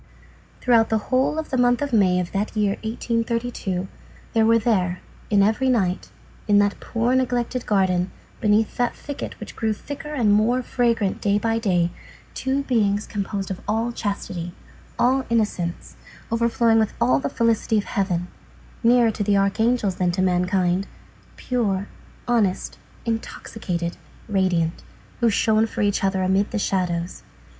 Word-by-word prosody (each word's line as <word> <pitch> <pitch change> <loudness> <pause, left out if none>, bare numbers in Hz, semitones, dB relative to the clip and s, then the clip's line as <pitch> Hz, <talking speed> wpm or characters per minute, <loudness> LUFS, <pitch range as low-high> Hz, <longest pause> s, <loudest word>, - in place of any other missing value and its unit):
Throughout 230 -3 +4
the 220 - +2
whole 260 +7 0
of 315 - -4
the 260 - +1
month 245 0 +3
of 285 -3 -3
May 185 -4 +4
of 175 -1 -3
that 205 +3 -2
year 205 -2 +2
1832, 230 -4 -2 0.5
there 225 -1 +4
were 230 0 +5
there, 185 -6 +1 0.3
in 200 -2 +4
every 220 +6 +2
night, 190 -7 0 0.4
in 205 -1 +5
that 205 0 +2
poor, 235 +2 0
neglected 250 -1 0
garden, 185 -3 +2 0.3
beneath 215 0 +2
that 245 -1 0
thicket 285 -1 -7
which - - -9
grew 220 -1 0
thicker 285 +7 -8
and 235 -8 +2
more 235 +5 +2
fragrant 230 -6 0
day 200 0 +2
by 225 +1 0
day, 175 -6 +1 0.4
two 270 +1 -1
beings 210 -5 +1
composed 200 -1 -4
of 185 - -5
all 225 +3 0
chastity, 185 -6 -4 0.4
all 260 +2 +3
innocence, 205 -7 -1 0.4
overflowing 230 0 +3
with 220 -1 0
all 130 +3 +3
the 140 - -2
felicity 230 -1 +1
of 205 - +1
heaven, 180 -4 -1 0.5
nearer 235 -1 +4
to 210 - -3
the 200 0 +2
archangels 205 0 +1
than 180 -1 +1
to 185 +1 0
mankind, 180 +1 +1 0.5
pure, 205 -6 -1 0.4
honest, 220 -6 0 0.3
intoxicated, 190 -6 -4 0.3
radiant, 185 -5 0 0.4
who 235 - +3
shone 220 +1 +2
for - - -4
each 205 -1 +1
other 190 -1 +1
amid 190 +2 +2
the 225 - -3
shadows. 180 -3 -1
210 Hz, 150 wpm, -23 LUFS, 190-235 Hz, 0.5 s, were